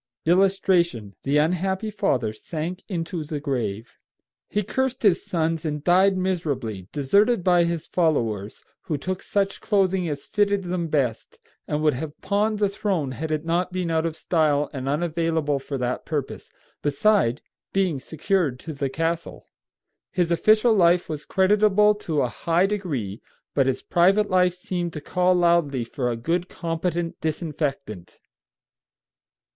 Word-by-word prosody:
[Illustration: 175 - +2
THE 140 +2 +1
UNHAPPY 190 +7 0
FATHER 130 - 0
SANK 165 - -5
INTO 170 -2 -3
THE 150 0 -4
GRAVE.] 120 -6 -3 0.5
He 210 - 0
cursed 260 +5 -2
his 190 -4 +4
sons 165 -2 -1
and 150 -2 -3
died 190 +3 +4
miserably, 140 - -2
deserted 200 - +2
by 175 -1 +4
his 170 -2 -2
followers, 115 - -1 0.2
who 155 -5 -1
took 185 +6 -4
such 200 -1 -1
clothing 190 -4 +1
as 145 -2 -5
fitted 200 -1 +1
them 175 -1 -2
best, 135 -7 -1 0.3
and 150 +1 -1
would 150 - +4
have 145 +4 -6
pawned 210 +2 0
the 205 -1 +2
throne 195 -8 -2
had 155 +4 -4
it 155 +1 -1
not 175 +2 0
been 180 -2 -2
out 160 0 +1
of 160 - -5
style 150 -4 +1
and 135 -1 -3
unavailable 160 -1 0
for 135 +1 -5
that 125 0 -2
purpose, 145 -4 -4 0.3
beside 145 - +2 0.3
being 185 -7 +1
secured 160 -2 -1
to 160 - -6
the 140 -1 -2
castle. 165 +3 -3 0.6
His 175 -2 0
official 215 +6 +4
life 175 -3 +3
was 150 -1 -5
creditable 210 +2 +4 0.2
to 150 -3 +2
a - - +1
high 165 - +1
degree, 145 - -3 0.3
but 135 -2 +2
his 135 -1 -1
private 195 +4 +3
life 180 -1 +3
seemed 175 -2 -4
to 150 - -5
call 180 +4 +2
loudly 170 -7 +2
for 125 +2 -3
a 120 - -2
good, 170 +9 -1
competent 170 0 -3
disinfectant. 150 - -3
165 Hz, 150 wpm, -24 LUFS, 145-185 Hz, 0.6 s, his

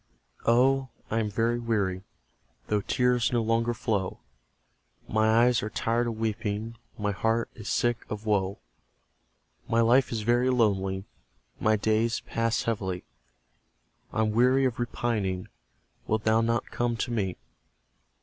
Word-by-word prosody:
Oh, 130 +3 +4 0.2
I 115 - +1
am 110 -2 0
very 115 +3 0
weary, 100 -6 -1 0.7
Though 105 -1 +2
tears 125 +1 +1
no 120 -2 +1
longer 115 +1 +1
flow; 105 -5 -2 0.9
My 110 +2 +4
eyes 125 -2 +3
are 105 - -3
tired 115 +2 0
of 115 -2 -3
weeping, 110 0 -2 0.2
My 105 -1 -1
heart 110 +3 0
is 110 - -8
sick 120 -1 +1
of 105 +1 -5
woe; 100 -2 +1 1.1
My 115 - +2
life 120 +3 +4
is 115 -2 -2
very 120 +3 +2
lonely 95 -6 +1 0.5
My 110 0 +3
days 110 +2 +1
pass 115 0 -1
heavily, 95 -5 -2 1.1
I'm 110 -1 +1
weary 125 +4 +4
of 125 -2 -1
repining; 110 -6 -2 0.6
Wilt 110 0 0
thou 110 +1 +3
not 115 0 -1
come 120 -1 -1
to 120 - -2
me? 95 -6 -1
115 Hz, 135 wpm, -27 LUFS, 105-120 Hz, 1.1 s, Oh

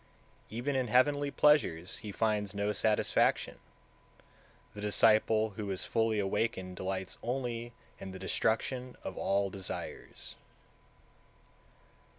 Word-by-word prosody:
Even 125 +5 -2
in 130 -2 +1
heavenly 145 +5 +3
pleasures 140 - +3
he 105 - -6
finds 105 -2 0
no 100 +1 0
satisfaction, 105 +1 +2 1.1
the 105 - -8
disciple 110 +1 +4
who 100 0 -5
is 95 -1 -2
fully 115 -1 +1
awakened 95 -2 -1
delights 95 0 -4
only 120 -1 -3 0.3
in 95 - -7
the 95 - -7
destruction 125 +6 -1
of 95 - -5
all 100 0 +1
desires. 95 -2 -6
110 Hz, 110 wpm, -32 LUFS, 95-120 Hz, 1.1 s, disciple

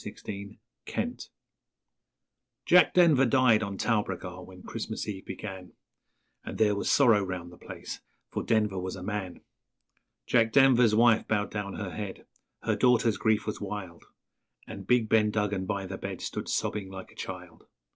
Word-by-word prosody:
Ben 100 +1 -7 0.3
Duggan 245 +2 -3 1.5
Jack 180 0 +5
Denver 165 -7 +6
died 120 -3 +4
on 100 -2 -4
Talbragar 95 -5 -2
when 90 0 -13
Christmas - - -5
Eve 95 -3 -6
began, 95 -2 -7 0.7
And - - -7
there 105 -2 +3
was 100 - -2
sorrow 115 -7 +5
round 90 -2 -5
the 90 - -14
place, - - -8 0.3
for - - -2
Denver 105 -4 +1
was 95 +1 -4
a 90 - -8
man; 95 -2 -4 0.8
Jack 110 -1 +2
Denver's 125 -5 +5
wife 115 0 +4
bowed 105 -2 0
down 100 -2 -4
her 100 -3 -5
head 100 -1 -6 0.4
her - - +1
daughter's 120 -3 +3
grief 110 -1 +1
was 105 - -4
wild, 95 -4 -6 0.6
And 100 -3 -9
big 125 -3 +3
Ben 110 -1 +3
Duggan 105 -3 -1
by 100 0 -2
the 95 +1 -6
bed 95 -2 -5
stood - - -5
sobbing 100 -2 -2
like 95 -1 -9
a - - -20
child. - - -8
105 Hz, 155 wpm, -28 LUFS, 95-115 Hz, 1.5 s, Denver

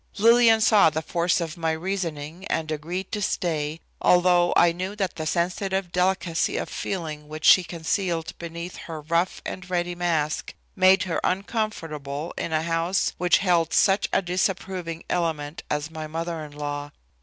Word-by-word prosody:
Lillian 230 +1 +6
saw 210 -4 +6
the 160 +1 -3
force 170 +3 +1
of 165 0 -4
my 165 -1 0
reasoning 170 -1 -4
and 160 -1 -2
agreed 170 +5 -4
to 210 - -2
stay, 160 -5 -1 0.2
although 180 -1 +4
I 170 - +6
knew 185 +4 -4
that 195 -3 -2
the 155 -1 -4
sensitive 185 +2 -1
delicacy 180 -2 +1
of - - -3
feeling 155 -5 -4
which 155 +1 -6
she 185 - +8
concealed 170 0 -2
beneath 170 +1 -6
her 160 -2 -7
rough 170 +4 0
and 185 -1 -6
ready 175 -1 -1
mask 165 -4 -1 0.2
made 190 0 +5
her 175 -3 -2
uncomfortable 170 - -2
in - - -3
a 155 0 +1
house 165 +3 0
which 180 -1 +4
held 170 -3 +2
such 195 +1 +3
a - - +2
disapproving 180 -2 -2
element 160 -3 -2
as 150 +2 -2
my 155 -1 -6
mother 165 +1 -4
in 150 -1 -10
law. 145 0 -4
170 Hz, 160 wpm, -25 LUFS, 160-185 Hz, 0.2 s, she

